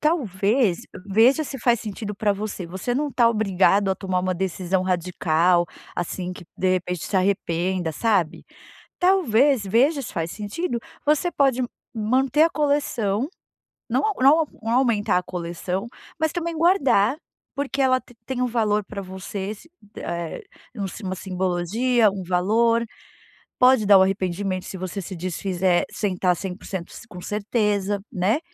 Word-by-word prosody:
talvez, 225 - +1 0.2
veja 230 +9 +4
se 270 -1 -6
faz 235 -1 +2
sentido 210 0 -5
pra 205 +1 +1
você, 200 -3 -5
você 190 +8 -3
não 290 +3 0
está 240 -4 +3
obrigado 200 -2 +2
a - - +2
tomar 185 -2 -1
uma 185 0 -1
decisão 185 0 -1
radical, 175 -1 +2 0.3
assim, 180 +1 -3
que 180 - -11
de 185 -1 +1
repente 180 -2 -3
se 195 - -1
arrependa, 185 -2 0
sabe, 190 -3 0 0.5
talvez, 290 - +3
veja 270 - +2
se - - -7
faz 165 -3 -2
sentido, 235 - -3 0.3
você 305 +4 +2
pode 270 -5 +2 0.3
manter 255 +6 +2
a 330 - +5
coleção, 280 -6 0 0.6
não - - +2 0.2
não 295 +5 +5 0.2
não 225 - -3
aumentar 235 -6 +2
a 180 - -1
coleção, 180 +3 -4 0.3
mas 315 0 +1
também 340 -1 -3
guardar, 275 - +3 0.4
porque 280 0 -2
ela 255 -1 +4
te 245 - -19
tem 255 0 -3
um 250 - +2
valor 215 -3 +1
pra 200 0 -7
você, 190 +2 -5
sim 220 - -16 0.3
eh, 170 - -4 0.3
um 205 -3 -3 0.2
uma 185 - -2
simbologia, 190 +6 +1
um 190 -1 -5
valor, 220 +6 +2 0.7
pode 250 -3 +5
dar 200 -1 +8
o - - +6
arrependimento 190 0 -1
se - - -7
você 185 +2 -4
se 185 +2 -7
desfizer 180 +1 0
sem 200 -3 -1
está 180 0 +2
100% 185 -1 -6
s - - -11
com 180 -6 -10
certeza, 205 -1 0
né. 195 +9 +1
205 Hz, 150 wpm, -23 LUFS, 185-245 Hz, 0.7 s, dar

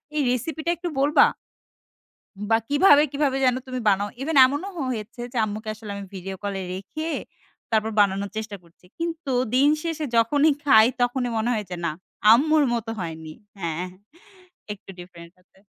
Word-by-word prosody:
এই 300 - +2
রেসিপিটা 315 +6 -3
একটু 350 +1 -4
বলবা? 290 +3 +5 1.2
বা 225 - +5
কিভাবে 290 0 +6
কিভাবে 280 -2 0
যেন 250 -1 +3
তুমি 255 0 -4
বানাও? 200 +1 +1
ইভেন 300 +2 -1
এমনও 285 +8 -2
হ - - -10
হয়েছে 230 +1 -6
যে - - -4
আম্মুকে 215 +1 -6
আসলে 215 -1 -9
আমি 200 - -6
ভিডিও 190 +1 -6
কলে 200 -1 -3
রেখে, 255 - -6 0.6
তারপর 220 0 +1
বানানোর 200 0 +2
চেষ্টা 220 -1 -5
করছি। 170 +1 -24
কিন্তু 330 -4 -3 0.2
দিন 275 +3 +5
শেষে 325 -2 -3
যখনই 285 +7 +4
খাই 220 -6 +7 0.2
তখনই 245 0 0
মনে 220 +2 0
হয় 215 -2 -2
যে 180 - -4
না, 170 - 0 0.4
আম্মুর 305 +6 +5
মত 235 -1 -3
হয়নি। 160 -2 -6 0.3
হ্যাঁ 170 -1 -3 0.9
একটু 200 - -18
ডিফারেন্ট 170 -1 -12
আছে। 190 - -29
230 Hz, 160 wpm, -24 LUFS, 200-290 Hz, 1.2 s, খাই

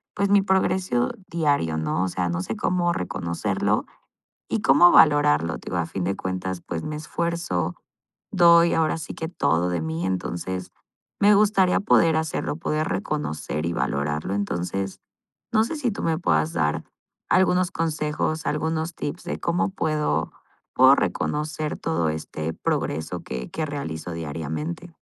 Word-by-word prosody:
pues 200 - +1
mi 200 0 +5
progreso 190 -8 +1 0.2
diario, 145 - +1
¿no? 80 +3 0
O - - 0
sea, 90 0 -1
no 85 0 -1
sé 110 +4 -4
cómo 175 -1 +1
reconocerlo 85 - -1 0.6
y 110 -2 -1
cómo 145 +6 +7
valorarlo. 85 - +5
Te - - -17
digo, 90 - -2
a 85 - +1
fin 90 +2 -4
de 95 +2 -1
cuentas, 95 -1 -4
pues, 85 -2 -3
me 155 - -4
esfuerzo, 165 - -2 0.6
doy 170 -2 +6
ahora 160 0 +1
sí 160 - -6
que 160 - -4
todo 90 - +1
de 85 -2 -1
mí. 80 +2 -2
Entonces, 95 0 -3 0.5
me 205 +1 +6
gustaría 200 -3 +3
poder 165 -6 +4
hacerlo, 160 -2 -2
poder 155 -1 -1
reconocer 80 - -3
y 85 - -1
valorarlo. 75 +5 -1
Entonces, 95 -1 -3 0.5
no 220 -1 +4
sé 315 - -4
si 260 -5 0
tú - - -5
me 160 -1 +1
puedas 80 - +1
dar 75 -2 0 0.5
algunos 185 -1 +3
consejos, 155 -1 -1
algunos 160 +2 -1
tips 155 +3 -5
de - - -4
cómo 170 +2 0
puedo, 155 -5 -1 0.4
puedo 130 +2 +7
reconocer 150 +1 -2
todo 80 -1 0
este 80 +1 -4
progreso 80 +3 -2
que 65 -1 -6
que 160 - -2
realizo 90 - -5
diariamente. 80 - -5
135 Hz, 150 wpm, -24 LUFS, -, 0.6 s, cómo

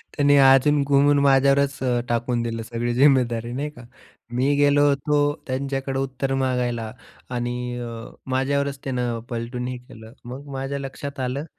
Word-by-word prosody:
त्यांनी 145 -1 +4
अजून 135 +2 +5
घुमून 140 +1 +4
माझ्यावरच 140 0 +3
अ, 125 -2 +1
टाकून 120 0 0
दिलं 115 -1 -3
सगळी 120 +1 -3
जिम्मेदारी, 120 -4 +3
नाही 145 +3 -3
का? 120 - -14 0.5
मी 135 +4 +1
गेलो 145 0 +4
होतो 140 +1 +1 0.3
त्यांच्याकडे 135 0 -2
उत्तर 135 0 -2
मागायला 125 -4 -1 0.4
आणि 125 0 -3
अ, 120 - -5 0.4
माझ्यावरच 140 +1 0
त्यानं 125 -3 -2
पलटून 120 +1 -4
हे 125 0 -4
केलं. 110 -2 -14
मग 130 +4 -8
माझ्या 135 +1 -3
लक्षात 140 +1 -7
आलं, 130 +4 -2
130 Hz, 145 wpm, -23 LUFS, 120-140 Hz, 0.5 s, अजून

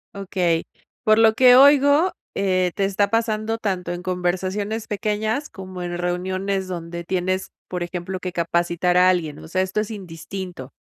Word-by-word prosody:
Okey. 180 -4 0 0.4
Por 215 +1 +4
lo 225 -1 +6
que 250 -1 +7
oigo, 285 +5 +6 0.2
eh, 185 -2 +1
te 195 - +1
está 200 +1 +1
pasando 225 0 0
tanto 185 -5 -2
en 175 0 -4
conversaciones 185 +4 -2
pequeñas 215 +6 -2
como 185 -2 -8
en 175 0 -4
reuniones 185 +2 -2
donde 170 -1 -6
tienes, 185 +1 -2 0.2
por 180 -1 -3
ejemplo, 180 +2 -5
que 180 0 -4
capacitar 170 +1 0
a 180 0 +6
alguien. 160 -5 0
O - - -11
sea, 185 +3 0
esto 190 +3 -1
es 220 - -5
indistinto. 180 -6 -7
185 Hz, 160 wpm, -22 LUFS, 175-210 Hz, 0.4 s, que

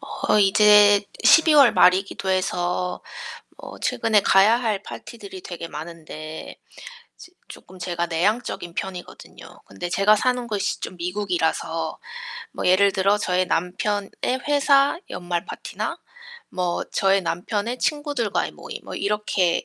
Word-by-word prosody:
어 210 - -1
이제 205 0 +6 0.2
12 320 -1 +6
월 280 -5 +7
말이기도 190 +1 +2
해서 180 -1 -1 0.6
어 - - -11
최근에 215 -2 +1
가야 195 +4 +5
할 215 -5 -1
파티들이 200 -5 -10
되게 175 -2 -7
많은데 155 -1 -8 0.6
지 360 - -14 0.2
쪼끔 185 - -13
제가 175 -1 -2
내향적인 175 +1 -1
편이거든요. 185 -2 -8
근데 100 - -7
제가 200 +4 +4
사는 250 +2 0
곳이 210 -3 -2
좀 - - -6
미국이라서 170 -3 -2 0.6
뭐 - - -4
예를 195 +2 +4
들어 195 +2 +2
저희 185 -2 0
남편의 195 +4 -2 0.4
회사 280 +1 +3
연말 175 -1 -3
파티나 - - -5 0.5
뭐 180 -2 -2
저희 195 0 +2
남편의 205 +7 -3
친구들과의 290 -8 -1
모임 - - -9
뭐 - - -8
이렇게 200 -4 0
195 Hz, 270 characters per minute, -23 LUFS, 175-210 Hz, 0.6 s, 월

